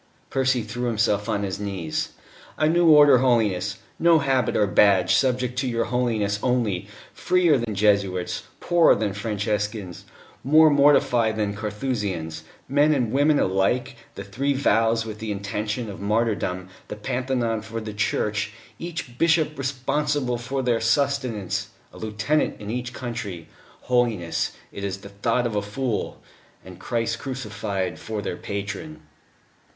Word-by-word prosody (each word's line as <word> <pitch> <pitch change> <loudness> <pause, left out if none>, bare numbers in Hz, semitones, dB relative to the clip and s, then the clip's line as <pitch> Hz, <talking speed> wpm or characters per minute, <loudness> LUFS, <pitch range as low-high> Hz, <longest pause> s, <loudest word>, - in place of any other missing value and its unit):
Percy 130 -3 +1
threw 120 +3 -4
himself 105 -3 +1
on 100 - 0
his 95 -1 -3
knees. 95 -6 -3 0.5
"A 155 - +2
new 170 +2 +3
Order, 145 -4 +8
Holiness 105 -6 +1 0.2
no 170 -1 +5
habit 135 -5 +1
or 105 - +4
badge 100 -2 +4
subject 125 -1 +1
to 135 - -1
your 115 -1 0
Holiness 110 -5 0
only 110 -7 0 0.3
freer 180 -4 +3
than 115 -3 -3
Jesuits, 100 -3 +1 0.2
poorer 175 -1 +4
than 105 -2 -1
Franciscans, 105 -2 -3 0.4
more 155 +3 +6
mortified 135 -6 +4
than 105 -2 -1
Carthusians: 105 -7 -3 0.2
men 145 +3 +3
and 120 -5 0
women 145 +2 +3
alike 120 +7 +1 0.2
the 100 - -6
three 130 +9 -1
vows 115 -3 +2
with 110 -1 -7
the 110 -1 -4
intention 105 +3 -3
of 100 - -8
martyrdom; 100 -4 -1 0.2
the - - -6
Pantheon 125 -1 -1
for 110 +1 -6
their 110 -1 -6
Church; 105 +1 -1 0.3
each 165 -8 -6
bishop 160 -2 +3
responsible 135 -1 -1
for 130 +3 -3
their 120 -2 +1
sustenance; 125 -5 0 0.3
a - - -12
lieutenant 110 +8 -1
in 105 0 -6
each 120 0 -3
country.... 115 -10 -6 0.3
(Holiness, 115 -9 0 0.2
it 100 - -7
is 100 -1 -2
the 100 - -10
thought 115 +5 0
of 115 -3 -2
a 105 - +1
fool.)... 105 +1 -3 0.5
And 90 -1 -11
Christ 115 +1 -2
Crucified 105 -9 -4
for 110 -2 -5
their - - -3
patron." 100 -7 -5
115 Hz, 145 wpm, -24 LUFS, 100-130 Hz, 0.5 s, Order